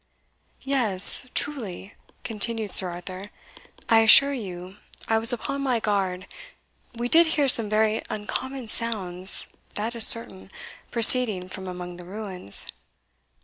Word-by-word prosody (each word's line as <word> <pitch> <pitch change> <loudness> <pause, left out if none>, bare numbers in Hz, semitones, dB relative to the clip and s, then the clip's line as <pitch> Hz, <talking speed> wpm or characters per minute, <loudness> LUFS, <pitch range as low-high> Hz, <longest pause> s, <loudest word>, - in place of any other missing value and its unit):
"Yes 250 -3 +3
truly," 210 -9 -7 0.3
continued 220 -1 -5
Sir 185 - +5
Arthur 185 +3 -10 0.6
"I 225 - +3
assure 275 +6 +6
you 185 -5 -10 0.3
I 225 0 0
was 225 +1 +5
upon 275 +4 -6
my 255 -4 -2
guard 195 -3 -4 0.7
we 240 +1 -5
did 330 +5 +4
hear 285 -2 0
some 230 -4 +6
very 215 +1 -1
uncommon 255 +4 -7
sounds, 190 -6 -2 0.3
that 220 +3 -5
is 230 -2 +2
certain, 195 -5 -3 0.4
proceeding 225 -5 +5
from 190 0 -10
among 180 -1 -9
the 180 - -13
ruins." 190 - -4
215 Hz, 125 wpm, -22 LUFS, 185-235 Hz, 0.7 s, assure